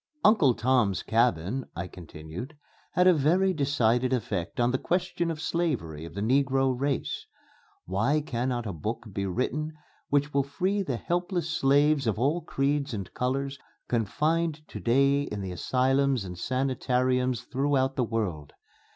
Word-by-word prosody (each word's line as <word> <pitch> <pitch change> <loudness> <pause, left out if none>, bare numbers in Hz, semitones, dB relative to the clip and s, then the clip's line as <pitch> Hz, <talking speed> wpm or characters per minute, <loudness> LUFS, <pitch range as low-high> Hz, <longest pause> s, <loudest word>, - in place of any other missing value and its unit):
"'Uncle 160 - +5
Tom's 115 -7 +2
Cabin,'" 115 +1 +1
I 85 - -3
continued, 85 - -9 0.4
"had 180 - +3
a 185 - +7
very 175 +6 +3
decided 130 -5 +2
effect 105 -8 -2
on 120 +1 +3
the 130 - 0
question 175 -1 -1
of 160 -2 -3
slavery 135 - -2
of 85 - -10
the 100 - -3
negro 135 +1 +2
race. 140 +1 -2 0.6
Why 115 - +1
cannot 125 -3 -2
a 100 - -3
book 110 +9 -4
be 100 0 -2
written 145 - -2 0.4
which 145 +1 +1
will 140 - +4
free 185 +9 -1
the 135 -11 -2
helpless 175 - -1
slaves 145 -2 +3
of 110 - +1
all 145 +9 +1
creeds 140 -3 -1
and 95 -3 -6
colors 135 +2 -2 0.3
confined 150 - 0
to - - -7
day 140 +4 +3
in 105 -7 -4
the 95 -2 -4
asylums 130 +4 +1
and 90 -1 -6
sanitariums 130 +2 0
throughout 135 0 0
the 130 - +1
world? 100 -11 -3
130 Hz, 150 wpm, -28 LUFS, 115-145 Hz, 0.6 s, a